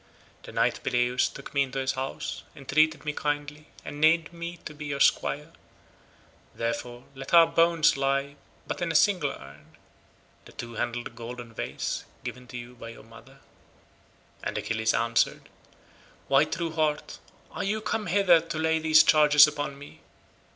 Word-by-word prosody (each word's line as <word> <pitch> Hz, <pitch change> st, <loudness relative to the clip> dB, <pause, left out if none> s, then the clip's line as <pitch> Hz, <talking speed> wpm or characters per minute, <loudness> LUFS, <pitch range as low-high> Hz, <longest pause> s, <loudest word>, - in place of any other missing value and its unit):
The -, -, -11 dB
knight -, -, +1 dB
Peleus 125 Hz, +1 st, +1 dB
took 135 Hz, -, -10 dB
me 140 Hz, -, +2 dB
into 135 Hz, 0 st, -2 dB
his 130 Hz, -1 st, 0 dB
house, 130 Hz, +1 st, -5 dB
entreated 155 Hz, +3 st, +1 dB
me 150 Hz, -, -2 dB
kindly, 145 Hz, +1 st, -3 dB, 0.2 s
and 145 Hz, -, -7 dB
named 160 Hz, +1 st, +3 dB
me 170 Hz, +1 st, -6 dB
to 150 Hz, -, -7 dB
be 150 Hz, 0 st, -8 dB
your 140 Hz, -1 st, -3 dB
squire; 150 Hz, +3 st, +2 dB, 1.0 s
therefore 120 Hz, +1 st, -4 dB
let 135 Hz, +4 st, -2 dB
our 165 Hz, -1 st, +9 dB
bones 165 Hz, -1 st, +3 dB
lie 135 Hz, 0 st, +1 dB
in 140 Hz, +1 st, -14 dB, 0.3 s
but -, -, -5 dB
a 165 Hz, -1 st, -1 dB
single 165 Hz, -2 st, +3 dB
urn, 70 Hz, -, -12 dB, 0.7 s
the -, -, -15 dB
two 120 Hz, 0 st, -7 dB
handled 120 Hz, 0 st, -4 dB
golden 120 Hz, 0 st, -8 dB
vase -, -, -4 dB, 0.2 s
given 125 Hz, 0 st, -7 dB
to 125 Hz, -, -8 dB
you 120 Hz, +1 st, -9 dB
by 115 Hz, -1 st, -10 dB
your 115 Hz, -, -12 dB
mother." 125 Hz, +5 st, -16 dB, 1.0 s
And -, -, -3 dB
Achilles 110 Hz, 0 st, 0 dB
answered, 115 Hz, +1 st, 0 dB, 0.8 s
"Why, 135 Hz, +2 st, +4 dB
true 165 Hz, +1 st, -3 dB
heart, 155 Hz, -2 st, -1 dB, 0.3 s
are -, -, -4 dB
you 210 Hz, +2 st, -1 dB
come 215 Hz, 0 st, -3 dB
hither 180 Hz, -2 st, +5 dB
to 165 Hz, -1 st, -6 dB
lay 160 Hz, 0 st, +1 dB
these 155 Hz, -1 st, +6 dB
charges 150 Hz, -3 st, +7 dB
upon 145 Hz, -2 st, -4 dB
me? 145 Hz, +1 st, -13 dB
145 Hz, 160 wpm, -27 LUFS, 125-160 Hz, 1.0 s, our